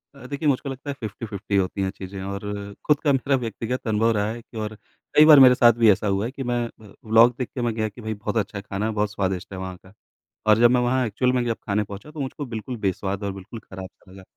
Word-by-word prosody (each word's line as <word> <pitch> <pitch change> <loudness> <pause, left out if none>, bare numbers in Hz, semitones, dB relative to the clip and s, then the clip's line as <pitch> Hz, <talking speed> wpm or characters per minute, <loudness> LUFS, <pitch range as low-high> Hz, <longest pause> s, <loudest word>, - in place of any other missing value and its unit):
अ, 140 - -13
देखिए 145 +3 -2
मुझको 135 +1 0
लगता 135 +2 -7
है - - -1
50-50 105 -2 -5
होती 95 +1 0
हैं 95 - 0
चीज़ें। 95 0 -7
और 100 +1 -5
खुद 150 -1 +3
का 145 - +3
मेरा 135 +1 +1
व्यक्तिगत 120 +1 -4
अनुभव 110 +2 +2
रहा 105 0 +1
है 120 +1 -7
कि 115 - -13
और 110 0 -4 0.4
कई 150 - +8
बार 155 -2 +9
मेरे 130 -1 +8
साथ 120 -2 +6
भी 115 - +7
ऐसा 105 +2 0
हुआ 100 +1 0
है 120 - -4
कि 135 0 -6
मैं 120 -1 0 0.2
अ, - - -16
व्लॉग 115 +2 +5
देख 125 - -3
के 125 - -2
मैं 120 -2 0
गया 110 -1 -1
कि 105 +4 -13
भाई 110 0 -3
बहुत 110 +2 -4
अच्छा 105 -1 -2
खाना, 100 +3 -3
बहुत 105 -1 -1
स्वादिष्ट 95 -2 -3
है 95 - -6
वहाँ 95 -1 -6
का। 95 - -18 0.5
और 105 - +6
जब 120 0 +6
मैं 125 - +3
वहाँ 125 +1 +1
एक्चुअल 125 +4 +1
में 125 - +1
जब 115 -1 -1
खाने 105 0 +1
पहुँचा 105 +9 -10
तो 155 - -9
मुझको 140 +1 -4
बिल्कुल 120 +1 -6
बेस्वाद 95 +2 -2
और 100 - -1
बिल्कुल 95 +4 -9
खराब 95 -2 -9
सा 95 - -22
लगा। 95 0 -13
110 Hz, 265 wpm, -24 LUFS, 100-125 Hz, 0.5 s, बार